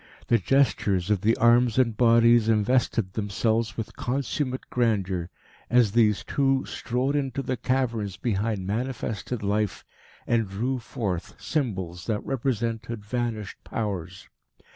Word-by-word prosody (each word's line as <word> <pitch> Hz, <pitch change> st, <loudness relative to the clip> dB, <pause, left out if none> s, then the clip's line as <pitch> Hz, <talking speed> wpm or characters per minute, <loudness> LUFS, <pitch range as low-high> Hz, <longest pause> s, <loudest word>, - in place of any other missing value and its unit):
The 115 Hz, -, +4 dB
gestures 105 Hz, -8 st, +2 dB
of 100 Hz, -3 st, +2 dB
the 110 Hz, +3 st, +2 dB
arms 120 Hz, 0 st, +4 dB
and 120 Hz, -4 st, +3 dB
bodies 115 Hz, -1 st, +5 dB
invested 110 Hz, -2 st, +1 dB
themselves 110 Hz, +1 st, 0 dB
with 115 Hz, -, -5 dB
consummate 130 Hz, +1 st, -2 dB
grandeur, 95 Hz, -7 st, 0 dB, 0.4 s
as 120 Hz, -4 st, +4 dB
these 105 Hz, -2 st, +3 dB
two 135 Hz, -1 st, +1 dB
strode 125 Hz, +4 st, -2 dB
into 135 Hz, -2 st, -1 dB
the 130 Hz, -, -1 dB
caverns 115 Hz, -7 st, -1 dB
behind 105 Hz, -3 st, -1 dB
manifested 115 Hz, +1 st, -3 dB
life 105 Hz, 0 st, -1 dB, 0.4 s
and 115 Hz, -4 st, +1 dB
drew 125 Hz, +7 st, -2 dB
forth 100 Hz, -6 st, -4 dB
symbols 95 Hz, -, -3 dB
that 105 Hz, -2 st, -1 dB
represented 115 Hz, -4 st, -2 dB
vanished 115 Hz, -2 st, -3 dB
Powers. 95 Hz, -4 st, -4 dB
115 Hz, 120 wpm, -26 LUFS, 105-125 Hz, 0.4 s, bodies